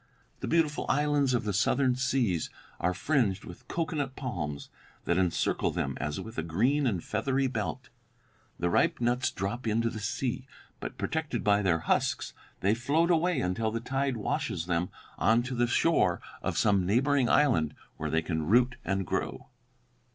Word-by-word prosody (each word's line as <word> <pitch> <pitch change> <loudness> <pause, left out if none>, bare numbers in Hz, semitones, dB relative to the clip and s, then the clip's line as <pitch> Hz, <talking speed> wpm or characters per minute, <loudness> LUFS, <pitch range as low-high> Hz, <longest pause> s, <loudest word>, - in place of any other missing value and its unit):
The - - -4
beautiful 160 -3 +1
islands 145 -2 +2
of 120 - 0
the 105 -1 -1
southern 125 +6 +2
seas 125 - 0 0.3
are 90 0 0
fringed 105 -6 +1
with 90 - -11
cocoanut 150 -5 -2
palms 75 - -4 0.4
that 85 +1 +2
encircle 90 -3 +1
them - - -2
as 75 0 -2
with 110 -6 -6
a - - +1
green 120 - +1
and 95 -8 -1
feathery 135 0 0
belt. 125 +1 -3 0.7
The 85 0 0
ripe - - +2
nuts 120 +1 +1
drop 105 +6 -4
into 115 +1 +1
the 110 - -6
sea, 125 +5 -2 0.3
but, - - -6
protected 155 -7 -2
by 105 0 +4
their 85 -5 +2
husks, - - 0 0.3
they 100 +3 +3
float 145 +9 +2
away 175 +2 +2
until 90 +5 0
the 115 +1 -2
tide 135 +1 -1
washes 90 -5 -2
them 85 0 0 0.3
on 115 +2 +4
to 130 +1 -4
the 120 0 +2
shore 165 +7 +2 0.2
of - - -2
some 100 -3 +3
neighboring 125 +6 +2
island, 80 - +3 0.2
where - - -3
they 80 0 +1
can 80 -1 -2
take 80 +1 -3
root 125 +3 +4
and 95 -1 -1
grow.'" - - -3
120 Hz, 170 wpm, -29 LUFS, 95-135 Hz, 0.7 s, by